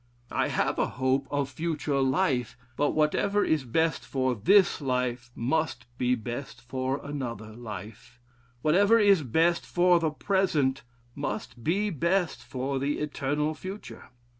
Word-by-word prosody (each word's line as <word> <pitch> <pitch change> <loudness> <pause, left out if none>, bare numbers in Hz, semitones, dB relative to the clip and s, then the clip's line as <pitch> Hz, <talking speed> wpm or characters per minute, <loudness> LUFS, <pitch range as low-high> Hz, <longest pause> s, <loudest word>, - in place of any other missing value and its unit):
I - - +1
have - - 0
a - - +2
hope 130 +1 +1
of 145 -2 0
future 150 -2 -2
life, 130 - +1 0.2
but 145 +3 +1
whatever 200 +7 +2
is 155 -3 +1
best 160 +7 +1
for 130 -1 0
this 175 - +4
life 125 -2 -1
must 130 0 -1
be 125 0 +2
best 120 +4 -6
for 130 +2 -3
another 120 -7 -5
life; 110 +2 -9 0.4
whatever 200 +8 +5
is 200 -5 +5
best 165 +6 +2
for 175 0 +3
the 160 -1 +1
present, 150 -6 +1 0.3
must 135 -3 -5
be 200 - +1
best 170 +2 0
for 135 +1 -3
the 140 +2 -1
eternal 150 +1 -1
future. 185 +7 -9
140 Hz, 140 wpm, -28 LUFS, 125-165 Hz, 0.4 s, whatever